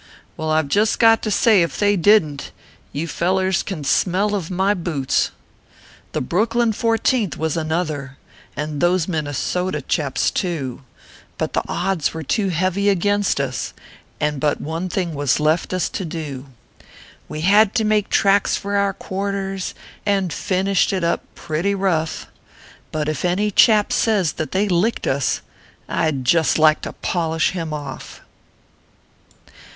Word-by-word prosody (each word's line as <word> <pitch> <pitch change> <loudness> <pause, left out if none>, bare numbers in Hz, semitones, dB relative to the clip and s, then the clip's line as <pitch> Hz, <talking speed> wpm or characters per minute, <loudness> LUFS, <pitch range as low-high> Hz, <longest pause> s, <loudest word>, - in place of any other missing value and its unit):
Well 160 0 -3
I 155 0 +3
ve - - -8
just 210 +9 +2
got 225 -1 +5
to 215 - -2
say, 210 -1 +4
if 170 - -1
they 205 0 +3
didn 175 -6 +4
t - - -7 0.5
You 155 +4 -3
fellers 185 +3 +1
can 170 -7 -5
smell 190 +8 +1
of 190 -6 -2
my 190 +2 +1
boots! 165 -8 0 0.8
The - - -1
Brooklyn 225 - +1
Fourteenth 225 - +1
was 160 -1 -1
another, 155 -4 -2 0.4
And 150 0 -3
those 175 -1 +2
Minnesota 160 +2 -2
chaps 145 0 0
too; 145 -9 -3 0.6
But - - -2
the - - +1
odds 175 -3 -1
were 160 - -4
too 200 - 0
heavy 185 +3 +1
against 205 -1 +1
us, 130 -4 -3 0.4
And 150 -2 -1
but 145 +1 0
one 165 +4 -4
thing 175 -2 -2
was 145 -1 +1
left 155 +3 +1
us 185 -2 0
to - - -4
do: 150 -5 -6 0.8
Wo 155 - -5
had 200 +6 +4
to 225 - +2
make 215 -1 +1
tracks 200 0 +3
for 200 +1 -3
our 200 -1 +1
quarters, 195 0 -4 0.3
And 195 -5 0
finished 195 0 +1
it 185 -2 -1
up 170 0 +1
pretty 170 +5 -1
rough; 170 -5 -1 0.7
But 155 -1 -2
if 155 -2 -2
any 190 +4 +1
chap 210 +1 +4
says 200 -8 +2
that 155 - -5
they 200 +2 +1
licked 195 +5 +1
us, 135 0 0 0.5
I 160 - +1
d 135 -4 -3
just 160 +5 +3
like 155 -1 +4
to - - -6
polish 165 -2 0
him 165 -4 -4
off! 145 -3 -7
175 Hz, 155 wpm, -21 LUFS, 155-200 Hz, 0.8 s, got